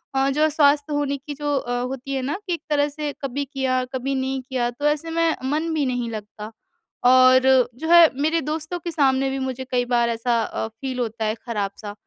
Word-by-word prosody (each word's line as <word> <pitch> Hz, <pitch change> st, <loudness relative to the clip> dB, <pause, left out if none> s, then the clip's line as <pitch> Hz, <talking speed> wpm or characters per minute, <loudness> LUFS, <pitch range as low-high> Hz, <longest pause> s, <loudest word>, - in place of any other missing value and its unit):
अ, 270 Hz, +1 st, +2 dB
जो 285 Hz, +2 st, 0 dB
है 310 Hz, -, +4 dB
स्वास्थ्य 290 Hz, 0 st, +2 dB
होने 285 Hz, -1 st, -1 dB
की 285 Hz, +2 st, -8 dB
जो 290 Hz, 0 st, -1 dB
अ, 245 Hz, -2 st, -2 dB
होती 265 Hz, +2 st, -5 dB
है 265 Hz, -, -1 dB
ना 280 Hz, +8 st, -2 dB
कि 355 Hz, -, 0 dB
एक 335 Hz, -, -4 dB
तरह 290 Hz, -1 st, +2 dB
से 295 Hz, 0 st, -4 dB
कभी 275 Hz, +1 st, -2 dB
किया, 260 Hz, -2 st, -1 dB
कभी 270 Hz, +1 st, -2 dB
नहीं 265 Hz, 0 st, -2 dB
किया 250 Hz, -2 st, 0 dB
तो 290 Hz, +5 st, -6 dB
ऐसे 300 Hz, +2 st, -1 dB
में 330 Hz, -1 st, +1 dB, 0.2 s
मन 320 Hz, +2 st, -1 dB
भी 300 Hz, -3 st, 0 dB
नहीं 245 Hz, -2 st, -2 dB
लगता। 210 Hz, 0 st, -8 dB, 0.6 s
और 255 Hz, 0 st, +7 dB, 0.3 s
जो 320 Hz, +6 st, -6 dB
है 340 Hz, -2 st, +9 dB
मेरे 315 Hz, +3 st, +2 dB
दोस्तों 310 Hz, +4 st, -4 dB
के 340 Hz, 0 st, -5 dB
सामने 270 Hz, -3 st, +2 dB
भी 270 Hz, 0 st, -3 dB
मुझे 260 Hz, 0 st, -4 dB
कई 245 Hz, -1 st, +1 dB
बार 240 Hz, -1 st, +1 dB
ऐसा 230 Hz, 0 st, 0 dB
अ, 220 Hz, -, -4 dB
फ़ील 255 Hz, +3 st, -6 dB
होता 225 Hz, -2 st, -2 dB
है 215 Hz, 0 st, 0 dB
खराब-सा। 205 Hz, -2 st, -4 dB
270 Hz, 220 wpm, -22 LUFS, 245-295 Hz, 0.6 s, है